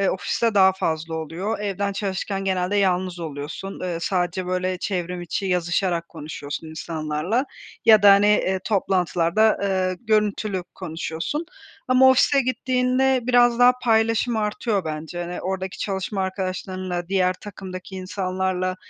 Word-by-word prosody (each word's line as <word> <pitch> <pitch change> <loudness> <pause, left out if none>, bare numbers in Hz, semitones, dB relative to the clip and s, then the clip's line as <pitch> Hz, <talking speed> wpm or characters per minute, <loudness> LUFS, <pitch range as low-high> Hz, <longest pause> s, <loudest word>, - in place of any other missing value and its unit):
ııı, 195 - +3
ofiste 225 +4 -1
daha 190 -1 +6
fazla 160 -3 -2
oluyor. 165 +7 -3
Evden 200 0 -2
çalışırken 195 0 -3
genelde 190 +1 0
yalnız 185 -2 +1
oluyorsun, 155 +5 -6
ııı, 175 -2 -3
sadece 180 0 -1
böyle 185 0 -1
çevrim 180 -2 -3
içi 190 +3 -3
yazışarak 175 -1 0
konuşuyorsun 150 0 -7
insanlarla 160 - -2 0.4
ya 215 -2 +7
da, 200 -1 +9
hani, 205 +1 +4
ııı, 190 -1 0
toplantılarda, 190 0 +2
ııı, 185 -2 0
görüntülü 210 -3 0
konuşuyorsun. 170 - -4 0.4
Ama 255 +1 +6
ofise 275 +2 +4
gittiğinde 255 +1 +1
biraz 240 -1 +4
daha 245 0 +7
paylaşım 225 0 +2
artıyor 210 -2 -1
bence, 155 +2 -5
hani, 175 +1 -5
oradaki 190 0 -4
çalışma 195 0 -2
arkadaşlarınla, 185 -1 -4
diğer 185 -1 +2
takımdaki 190 -1 -9
insanlarla 185 -1 -2
190 Hz, 130 wpm, -23 LUFS, 180-210 Hz, 0.4 s, da